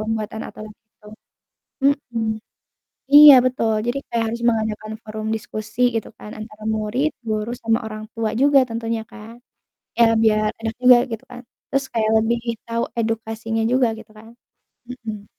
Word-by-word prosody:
pembuatan 220 0 -3
aturan 215 0 -10
itu. 220 -1 -25 1.1
Mhm, 230 -1 -1 0.9
iya 295 -1 +11
betul, 240 -3 0 0.2
jadi 245 +3 -1
kayak 230 -1 0
harus 235 +1 -4
mengadakan 220 -1 -2
forum 215 0 -6
diskusi 215 +2 -6
gitu 225 - -3
kan, 210 - -10
antara 215 0 -10
murid, 230 +8 -1 0.2
guru 215 +1 -2
sama 225 0 +2
orang 215 0 -7
tua 225 -1 -2
juga 285 0 +6
tentunya 230 0 -3
kan. 225 +1 -11 0.6
Ya, 235 - +6 0.2
biar 215 -1 +2
enak 225 0 -3
juga 250 -1 +8
gitu 225 +2 -5
kan, 245 - -9 0.3
terus 275 0 +1
kayak 220 -2 +1
lebih 235 +2 0 0.3
tahu 230 0 -1 0.2
edukasinya 225 0 -2
juga, 255 -1 +3
gitu 220 0 -13
kan, 220 - -14 0.6
mhm. 225 -4 -8
225 Hz, 150 wpm, -21 LUFS, 215-235 Hz, 1.1 s, iya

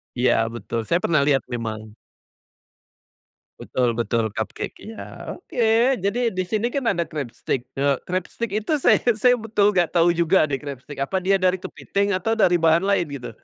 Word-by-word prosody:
Iya 125 +1 +3 0.2
betul 115 0 -4
saya 170 - +2
pernah 160 -3 +3
lihat 135 -3 +3
memang. 110 -2 -5 1.7
Betul 120 -3 -1
betul 115 -1 0
cupcake 110 - -4
iya 220 0 -8
oke 245 -9 -2 0.3
jadi 230 +5 0
di 185 - +1
sini 220 +4 -1
kan 270 0 -3
ada 170 -2 -2
crabstick, 130 -3 -4
eee, 140 0 +1
crabstick 185 +4 -3
itu 220 +9 0
saya - - +4 0.2
saya 250 +2 +5
betul 215 -3 +1
enggak 175 -3 +2
tahu 170 +1 +4
juga 170 0 +3
deh 135 -2 -3
crabstick 140 -1 -8
apa 190 +8 -1
dia 195 0 +3
dari 185 0 +3
kepiting 200 +2 -2
atau 225 +5 0
dari 175 -5 +3
bahan 165 +3 +4
lain 200 -4 +2
gitu? 125 - -8
175 Hz, 165 wpm, -23 LUFS, 135-205 Hz, 1.7 s, saya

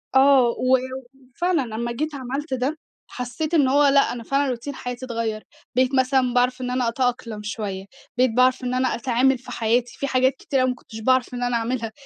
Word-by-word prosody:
آه. 265 -2 +6
و 255 +1 +3 0.6
وفعلًا 350 -3 +1
لمّا 235 +1 -2
جيت 300 +5 -3
عملت 270 +3 -4
ده، 260 +5 -1 0.3
حسّيت 255 +6 -5
إن 285 -5 +4
هو 285 +2 +4
لأ، 275 0 +4
أنا 235 -1 -7
فعلًا 275 +3 0
روتين 255 +3 -4
حياتي 245 0 -6
اتغيّر. 225 -3 -3 0.3
بقيت 255 +1 +2
مثلًا 260 -1 +2
باعرف 250 +1 +1
إن 250 0 -3
أنا 250 -1 0
أتأقلم 235 -3 -2
شوية. 200 -3 -4 0.3
بقيت 255 -2 +3
باعرف 255 +2 +3
إن 250 0 -2
أنا 255 0 +1
أتعامل 255 +2 +2
في 255 - -12
حياتي، 235 +2 0
في 280 - -2
حاجات 260 0 +2
كتيرة 260 -1 0
ما 250 - 0
كنتش 240 -2 -11
باعرف 255 +2 +2
إن 245 0 -3
أنا 245 0 0
اعملها. 230 -1 -2
255 Hz, 195 wpm, -23 LUFS, 240-265 Hz, 0.6 s, آه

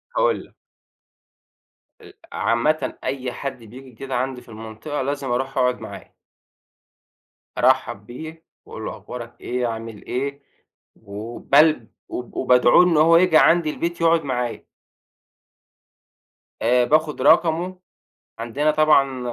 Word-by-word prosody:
هاقول - - +1
لك. - - -26 1.5
ال - - -15 0.2
عامةً 150 +7 0
أي 130 -1 -3
حد 135 -3 -6
بييجي 130 +4 -13
كده 130 +2 -6
عندي 130 0 -2
في 120 - -20
المنطقة 110 +7 -6
لازم 140 -1 -3
أروح 135 +2 -2
أقعُد 125 -1 +1
معاه. - - -10 1.4
أرحَّب 130 -6 +1
بيه 160 +7 -10 0.2
وأقول - - -8
له - - -4
أخبارك 120 -1 -10
إيه؟ 125 0 -2
عامل 115 -2 -7
إيه؟ 140 +3 -4 0.5
وبلب 115 +6 +1 0.2
وب 125 -1 -7
وبادعوه 125 +5 +5
إن 170 -3 +2
هو 165 +2 +6
ييجي 170 -2 +4
عندي 165 -1 +4
البيت 170 +2 -4
يقعُد 165 -1 +3
معايا. 125 -4 -3 2.0
آآ 125 +1 +3
باخد 155 +1 +1
رقمه، 175 +2 +3 0.6
عندنا 130 +7 0
طبعًا 150 -4 +3
135 Hz, 120 wpm, -22 LUFS, 120-155 Hz, 2.0 s, هو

